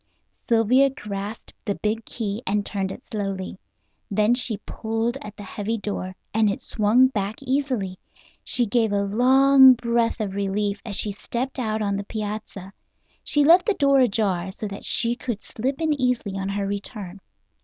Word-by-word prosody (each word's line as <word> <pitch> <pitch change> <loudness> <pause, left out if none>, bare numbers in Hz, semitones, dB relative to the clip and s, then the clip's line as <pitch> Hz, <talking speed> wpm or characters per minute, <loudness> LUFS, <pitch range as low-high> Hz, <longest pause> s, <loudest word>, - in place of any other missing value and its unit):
Sylvia 240 +4 +4
grasped 210 -4 -7
the 200 - -2
big 220 +1 -2
key 215 -1 -4
and 205 +1 0
turned 195 -2 -2
it 245 - -9
slowly. 195 -3 -4 0.5
Then 210 +3 +3
she 245 -3 +1
pulled 225 +2 -2
at 210 0 -9
the 205 - -8
heavy 210 +3 -3
door, 195 -3 -4 0.2
and 220 -1 +3
it 200 - -2
swung 230 +5 +3
back 205 -3 -2
easily. 255 -9 -1 0.4
She 245 - +1
gave 225 0 +1
a 200 0 +1
long 265 +5 +6
breath 235 0 0
of 205 -3 -2
relief 200 +1 -1
as 215 -4 -4
she 210 - 0
stepped 245 +6 -4
out 220 -2 -1
on 200 -1 0
the 200 - -3
piazza. 210 -2 -6 0.5
She 295 - +3
left 345 +6 +6
the 425 - +2
door 275 -1 +4
ajar, 200 -7 +1
so 210 +2 -5
that 200 - -8
she 235 0 +3
could 240 -4 -5
slip 265 +6 -3
in 320 -2 +1
easily 250 -7 -1
on 195 0 -3
her 200 0 -2
return. 200 -1 -5
215 Hz, 170 wpm, -24 LUFS, 200-245 Hz, 0.5 s, long